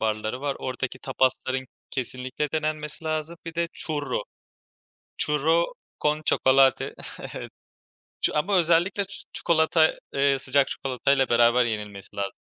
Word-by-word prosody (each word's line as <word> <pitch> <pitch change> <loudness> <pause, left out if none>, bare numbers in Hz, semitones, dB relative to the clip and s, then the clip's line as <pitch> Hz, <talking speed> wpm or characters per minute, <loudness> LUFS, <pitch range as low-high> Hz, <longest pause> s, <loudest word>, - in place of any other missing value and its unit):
barları 110 +3 -1
var. 140 -1 -2
Oradaki 130 0 -4
tapasların 130 0 0 0.2
kesinlikle 130 +3 -3
denenmesi 155 0 -2
lazım. 155 +1 -2
Bir 165 - -6
de 170 0 0
Churro. 145 -8 -2 1.0
Churro 160 +3 +3 0.4
con 150 +1 +1
chocolate. 135 -1 +4 0.4
Evet. - - -6 0.7
Ç - - +3
ama 185 +6 +2
özellikle 175 +4 +3 0.3
çikolata, 160 -1 +3 0.2
eee, 140 0 +3
sıcak 135 +1 +2
çikolatayla 135 0 +1
beraber 120 +1 +5
yenilmesi 105 -3 -5
lazım. 100 -1 -3
140 Hz, 115 wpm, -26 LUFS, 130-155 Hz, 1.0 s, beraber